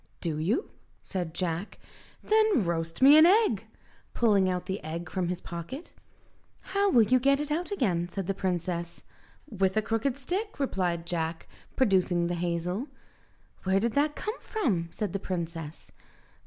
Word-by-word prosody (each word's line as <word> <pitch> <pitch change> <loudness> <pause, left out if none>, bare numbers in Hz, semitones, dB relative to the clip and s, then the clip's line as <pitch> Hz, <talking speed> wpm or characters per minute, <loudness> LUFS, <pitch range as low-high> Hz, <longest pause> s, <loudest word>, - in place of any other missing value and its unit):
"Do 155 -3 -2
you?" 215 - 0 0.3
said 175 -4 -4
Jack, 175 +2 -3 0.5
"then 430 - +3
roast 165 +5 -2
me 290 +3 +9
an 320 - +8
egg," 425 +4 +3 0.5
pulling 205 -5 +3
out 180 -1 -2
the 190 -2 -4
egg 165 +3 -5
from 185 -2 -1
his 180 0 -3
pocket. 175 - -7 0.8
"How 400 0 +3
will 235 -10 +6
you 255 +5 +3
get 275 +2 +3
it 295 0 -3
out 340 +4 -1
again?" 185 - 0
said 195 +1 -4
the 195 - -1
princess. 175 -2 -3 0.4
"With 195 -5 0
a - - +4
crooked 230 +5 -1
stick," 370 +8 -4
replied 180 -10 -1
Jack, 165 -1 -3 0.3
producing 185 -7 +2
the 175 - -1
hazel. 175 - -2 0.8
"Where 190 +1 +2
did 230 +2 0
that 295 +1 +1
come 430 +3 -4
from?" 205 - -1
said 210 -5 -3
the 195 - -1
princess. 165 -4 -5
190 Hz, 155 wpm, -28 LUFS, 170-270 Hz, 0.8 s, me